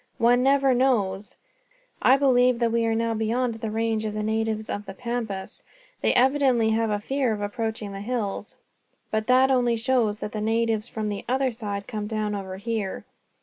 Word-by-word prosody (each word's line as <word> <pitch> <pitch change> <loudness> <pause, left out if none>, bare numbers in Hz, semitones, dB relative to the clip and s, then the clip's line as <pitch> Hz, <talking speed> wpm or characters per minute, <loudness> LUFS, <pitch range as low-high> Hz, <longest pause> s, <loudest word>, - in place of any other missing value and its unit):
One 245 0 +4
never 270 0 +4
knows. 210 -6 +1 0.7
I 260 +2 +6
believe 250 -3 +4
that 235 -1 +1
we 230 0 +1
are 225 - +1
now 230 0 0
beyond 230 +3 0
the 225 0 -5
range 225 0 -1
of 215 -1 -3
the 215 - -2
natives 220 0 -1
of 205 0 -5
the 195 - -7
Pampas. 230 -4 -4 0.4
They - - +3
evidently 255 -3 +3
have 225 0 +1
a 210 -1 0
fear 265 +1 0
of 210 - -5
approaching 215 0 -3
the 195 - -6
hills; 210 -3 -3 0.6
but 220 0 -1
that 260 +1 +5
only 245 -2 +3
shows 225 -3 +1
that 210 - -5
the 215 - -4
natives 225 0 0
from 215 -3 -3
the 205 -1 -4
other 260 0 +1
side 205 -4 -5
come 210 -3 -4
down 215 -1 -2
over 190 -2 -5
here. 210 -2 -3
225 Hz, 190 wpm, -25 LUFS, 210-245 Hz, 0.7 s, I